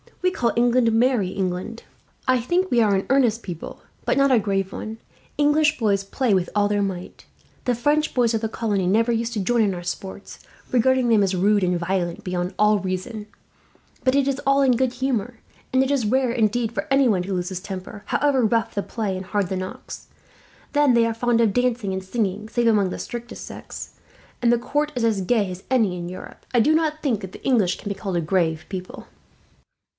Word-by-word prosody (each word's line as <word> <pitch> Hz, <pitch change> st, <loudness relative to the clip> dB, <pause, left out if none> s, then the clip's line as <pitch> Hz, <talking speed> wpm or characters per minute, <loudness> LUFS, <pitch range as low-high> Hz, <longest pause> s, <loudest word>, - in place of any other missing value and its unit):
We 365 Hz, -, +3 dB
call 235 Hz, -10 st, 0 dB
England 240 Hz, 0 st, +3 dB
'Merry 230 Hz, -3 st, +2 dB
England.' 185 Hz, +4 st, -3 dB, 0.4 s
I 255 Hz, -1 st, +4 dB
think 355 Hz, +10 st, 0 dB
we 240 Hz, -, +4 dB
are 210 Hz, -3 st, +3 dB
an 190 Hz, -, -1 dB
earnest 240 Hz, -4 st, +2 dB
people, 175 Hz, -4 st, -7 dB, 0.2 s
but -, -, +1 dB
not 275 Hz, 0 st, +4 dB
a 245 Hz, -, +5 dB
grave 195 Hz, -2 st, -1 dB
one. 220 Hz, +1 st, -6 dB, 0.4 s
English 295 Hz, +1 st, +3 dB
boys 200 Hz, -4 st, +1 dB
play 230 Hz, +3 st, 0 dB
with 185 Hz, -2 st, +1 dB
all 205 Hz, 0 st, +3 dB
their 205 Hz, 0 st, 0 dB
might. 185 Hz, -3 st, -5 dB, 0.4 s
The 245 Hz, -, +1 dB
French 295 Hz, +6 st, +1 dB
boys 240 Hz, -2 st, +3 dB
of 225 Hz, -, 0 dB
the 220 Hz, -, -1 dB
colony 205 Hz, -5 st, -1 dB
never 225 Hz, +5 st, +3 dB
used 230 Hz, 0 st, -1 dB
to 215 Hz, -, -2 dB
join 235 Hz, +4 st, +2 dB
in 200 Hz, -3 st, +1 dB
our 175 Hz, -, -7 dB
sports, 190 Hz, +3 st, -7 dB, 0.3 s
regarding 255 Hz, 0 st, +3 dB
them 220 Hz, -3 st, +5 dB
as 195 Hz, -1 st, +1 dB
rude 200 Hz, +2 st, +3 dB
and 180 Hz, -1 st, +1 dB
violent 175 Hz, -1 st, -2 dB
beyond 180 Hz, 0 st, -3 dB
all 210 Hz, 0 st, +4 dB
reason; 195 Hz, +4 st, -4 dB, 0.8 s
but 255 Hz, +1 st, +2 dB
it 280 Hz, -1 st, +2 dB
is 275 Hz, 0 st, -1 dB
all 275 Hz, 0 st, +4 dB
in 265 Hz, -2 st, +4 dB
good 255 Hz, 0 st, 0 dB
humour, 250 Hz, -2 st, -2 dB, 0.4 s
and 260 Hz, 0 st, +4 dB
it 265 Hz, -, -1 dB
is 270 Hz, -5 st, +1 dB
rare, 255 Hz, +3 st, +2 dB
indeed, 230 Hz, 0 st, +1 dB
for 200 Hz, -4 st, -4 dB
anyone 260 Hz, -9 st, +3 dB
to 195 Hz, +2 st, -4 dB
lose 180 Hz, -1 st, -2 dB
his 185 Hz, -2 st, -4 dB
temper, 195 Hz, +2 st, -8 dB
however 280 Hz, -3 st, +2 dB
rough 225 Hz, +1 st, +1 dB
the 200 Hz, -, -1 dB
play 210 Hz, -5 st, -3 dB
and 185 Hz, 0 st, -6 dB
hard 200 Hz, -3 st, -1 dB
the 190 Hz, -, -2 dB
knocks. 185 Hz, 0 st, -7 dB, 0.7 s
Then 290 Hz, -3 st, +4 dB
they 230 Hz, -1 st, +4 dB
are 230 Hz, -, 0 dB
fond 235 Hz, 0 st, +1 dB
of 220 Hz, -4 st, +2 dB
dancing 245 Hz, -5 st, 0 dB
and 190 Hz, 0 st, -3 dB
singing, 210 Hz, +1 st, -2 dB
save 240 Hz, 0 st, +1 dB
among 205 Hz, -4 st, +3 dB
the -, -, -5 dB
strictest 240 Hz, 0 st, -7 dB
sects; -, -, -9 dB, 0.5 s
and 240 Hz, -1 st, +4 dB
the 240 Hz, -, +4 dB
court 295 Hz, +5 st, -1 dB
is 245 Hz, -, -1 dB
as 220 Hz, -4 st, +2 dB
gay 200 Hz, -1 st, +1 dB
as 180 Hz, +1 st, -8 dB
any 225 Hz, -8 st, +2 dB
in 175 Hz, 0 st, -5 dB
Europe. 185 Hz, -, -10 dB
I -, -, +6 dB
do 295 Hz, +8 st, +4 dB
not 310 Hz, -1 st, 0 dB
think 240 Hz, -8 st, 0 dB
that 190 Hz, -1 st, -8 dB
the -, -, -12 dB
English 220 Hz, -9 st, +2 dB
can 205 Hz, -, -7 dB
be 200 Hz, -, -2 dB
called 190 Hz, -3 st, -3 dB
a -, -, +1 dB
grave 160 Hz, -1 st, 0 dB
people." 185 Hz, -2 st, -7 dB
225 Hz, 215 wpm, -23 LUFS, 190-250 Hz, 0.8 s, I